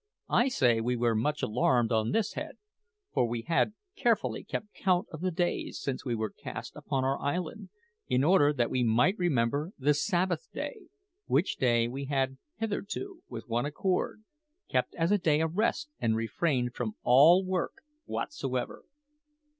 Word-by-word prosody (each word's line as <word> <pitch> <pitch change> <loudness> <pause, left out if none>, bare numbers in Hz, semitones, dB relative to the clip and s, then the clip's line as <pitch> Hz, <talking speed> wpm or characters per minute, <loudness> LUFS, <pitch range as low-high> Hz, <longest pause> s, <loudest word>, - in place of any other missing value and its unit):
I 240 - +4
say 120 - +3
we 125 +2 0
were 120 -1 +2
much 145 +8 0
alarmed 120 +1 +2
on 110 -1 +2
this 220 -2 0
head; - - -6 0.6
for 120 - +2
we 115 0 -3
had 170 - +1 0.2
carefully 215 - +1
kept 210 0 -5
count 185 -2 +1
of 160 - -7
the 185 - +1
days, 175 0 -1
since 135 -2 -3
we 120 -3 -1
were 110 -1 -2
cast - - -8
upon 135 -1 -2
our 135 +1 0
island, 180 +7 -3 0.4
in 130 - +2
order 150 -3 +5
that 125 -5 0
we 130 - +1
might 120 - +4
remember 145 - +1
the 145 +2 +3
Sabbath 185 - 0
day, 425 -7 -6 0.4
which 190 - +1
day 120 -2 +3
we 135 +3 -5
had 135 -1 -1 0.2
hitherto, 225 - -4
with - - -7
one 120 +3 0
accord, 185 +7 -1 0.4
kept - - 0
as 165 +2 +1
a 205 - +4
day 155 -4 +3
of 160 +1 -1
rest, 295 +8 0
and 110 -1 +1
refrained 125 +2 0
from 110 -4 -3
all 160 +9 +7
work 185 -2 -2 0.2
whatsoever. 130 - -3
145 Hz, 165 wpm, -30 LUFS, 120-185 Hz, 0.6 s, all